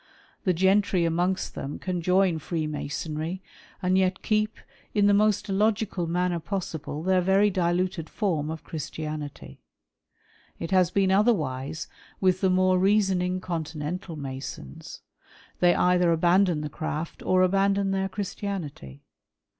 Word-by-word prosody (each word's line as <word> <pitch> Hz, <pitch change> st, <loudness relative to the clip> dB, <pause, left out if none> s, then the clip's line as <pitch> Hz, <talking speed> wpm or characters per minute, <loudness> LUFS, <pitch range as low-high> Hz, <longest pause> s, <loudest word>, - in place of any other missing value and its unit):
The 185 Hz, -, +3 dB
gentry 190 Hz, 0 st, +3 dB
amongst 175 Hz, +3 st, 0 dB
them 140 Hz, -, -5 dB
can 180 Hz, -2 st, -3 dB
join 180 Hz, -1 st, +2 dB
Freemasonry 155 Hz, +2 st, -3 dB, 0.4 s
and 185 Hz, +1 st, +3 dB
yet 185 Hz, 0 st, 0 dB
keep, 215 Hz, 0 st, 0 dB, 0.4 s
in 205 Hz, -1 st, +4 dB
the 205 Hz, -, +5 dB
most 210 Hz, 0 st, +2 dB
illogical 205 Hz, -2 st, 0 dB
manner 175 Hz, +1 st, 0 dB
possible, 160 Hz, -4 st, -4 dB
their 185 Hz, 0 st, +3 dB
very 195 Hz, +3 st, +3 dB
diluted 180 Hz, -1 st, 0 dB
form 165 Hz, -8 st, -1 dB
of 160 Hz, 0 st, -6 dB
Christianity. 155 Hz, -2 st, -6 dB, 1.0 s
It 165 Hz, -, -5 dB
has 185 Hz, -2 st, +4 dB
been 190 Hz, 0 st, +2 dB
otherwise 155 Hz, -, +1 dB, 0.3 s
with 185 Hz, -1 st, +2 dB
the 190 Hz, -, +3 dB
more 185 Hz, 0 st, +3 dB
reasoning 190 Hz, -2 st, +2 dB
Continental 165 Hz, 0 st, -4 dB
Masons. 135 Hz, -, -7 dB, 0.6 s
They 175 Hz, -1 st, +5 dB
either 180 Hz, -1 st, +3 dB
abandon 175 Hz, 0 st, +3 dB
the 150 Hz, -, -4 dB
Craft 155 Hz, +1 st, -5 dB
or 185 Hz, 0 st, +3 dB
abandon 195 Hz, +1 st, +2 dB
their 195 Hz, 0 st, 0 dB
Christianity. 185 Hz, -, -5 dB
180 Hz, 125 wpm, -26 LUFS, 160-195 Hz, 1.0 s, the